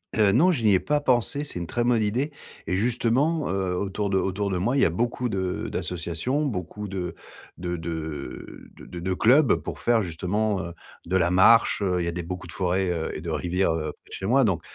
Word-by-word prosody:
Heu, 105 -3 +4
non, 165 - +5
je 135 -9 -1
n'y 105 -2 +5
ai 95 - +4
pas 150 +6 0
pensé, 130 +1 +1
c'est 145 - -6
une 85 - -3
très 120 +8 -1
bonne 120 -2 +3
idée. 120 +8 0 0.4
Et 90 - 0
justement, 125 - +1
heu, 95 -1 -1
autour 100 +2 -2
de 95 - +3
autour 95 +1 -1
de 90 - 0
moi, 120 +9 +1
il - - +3
y - - +6
a - - +3
beaucoup 120 +6 -1
de 95 -3 -2
d'associations. 90 - -2
Beaucoup 105 - -4
de 90 -3 -4 0.4
de 90 0 -3
de, 80 +1 -5
heu, 80 -2 -6
de 90 - -9
de 95 +2 -1
clubs 130 +7 +5
pour - - -6
faire 115 -2 +2
justement, 95 +4 -1
heu, 85 -1 -6 0.3
de 95 +2 +1
la 85 -1 +2
marche, 105 +5 +5
heu. 90 -3 +1
Il - - -1
y - - -2
a 85 - 0
des 85 +1 -4
beaucoup 90 +2 -6
de - - -10
forêts, 90 +2 0
heu 80 -2 -2
et 75 - -5
de 85 - -5
rivières, 90 +2 0
heu, 75 -2 -2
près - - -23
de - - -12
chez 95 - -5
moi. 135 +4 +4
Donc 95 -8 +1
95 Hz, 240 wpm, -25 LUFS, 90-120 Hz, 0.4 s, y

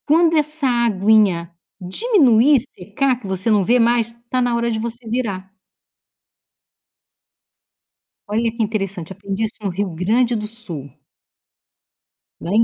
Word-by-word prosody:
Quando 325 +2 +4
essa 300 -2 +1
aguinha 210 -7 +2 0.3
diminuir 275 - +3
e 250 -5 -8
secar 250 +5 0
que 215 - -9
você 190 +3 -2
não 210 -3 +3
vê 240 +6 +3
mais, 230 -1 +2 0.2
tá 255 +1 0
na 245 -1 +1
hora 235 0 0
de 220 - -2
você 235 +1 -6
virar. 205 -5 -3 2.8
Olha 225 +2 0
que 230 0 -2
interessante, 195 -5 -3
aprendi 200 +2 -4
isso 220 - -2
no 200 - -2
Rio 195 +2 -2
Grande 230 +8 +1
do 210 -1 -3
Sul 180 - -6 1.5
lá - - -6
em 225 - +5
225 Hz, 140 wpm, -19 LUFS, 195-245 Hz, 2.8 s, em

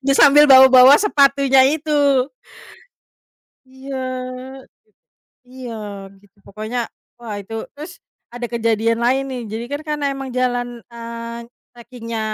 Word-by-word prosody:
ya 275 - +3
sambil 290 +1 +6
bawa-bawa 260 +1 +8
sepatunya 275 -8 +3
itu. 290 -3 +1 1.4
Iya 265 +1 -9 0.6
git - - -21 0.8
iya 255 -1 -10 0.5
gitu 205 0 -27
pokoknya 215 +4 -5 0.4
wah 230 -3 -8
itu. 210 +3 -12 0.2
Terus 305 +4 -9 0.4
ada 245 0 -5
kejadian 230 0 0
lain 260 +3 +1
nih, 250 -2 -5
jadi 225 +2 -5
kan 290 +1 -4
karena 295 -1 -3
emang 270 -1 -7
jalan, 245 -1 -1 0.2
eee, 235 0 -8 0.2
trekingnya 235 -2 -8
255 Hz, 115 wpm, -19 LUFS, 235-275 Hz, 1.4 s, bawa-bawa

